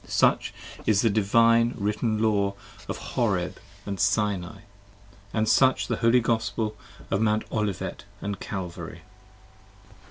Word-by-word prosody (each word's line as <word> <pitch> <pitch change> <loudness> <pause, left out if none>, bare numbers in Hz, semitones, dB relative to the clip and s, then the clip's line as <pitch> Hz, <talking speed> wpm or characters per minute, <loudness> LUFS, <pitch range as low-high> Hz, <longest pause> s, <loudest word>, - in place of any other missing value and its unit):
Such - - +2 0.4
is 105 -2 +4
the 115 - +4
Divine 115 +3 +4
Written 105 +1 0
Law 100 -2 +2 0.3
of - - -2
Horeb - - -1 0.3
& 100 -1 -4
Sinai: 100 -2 +1
69 100 +2 -12 0.7
And 110 -1 0
such 130 +3 +4
the - - -2
Holy 115 +1 +4
Gospel 115 -1 -1 0.4
of 100 - +1
Mount 110 0 +2
Olivet 105 -4 -2 0.2
& 100 0 -3
Calvary. 90 -4 -6
105 Hz, 125 wpm, -26 LUFS, 100-115 Hz, 0.7 s, is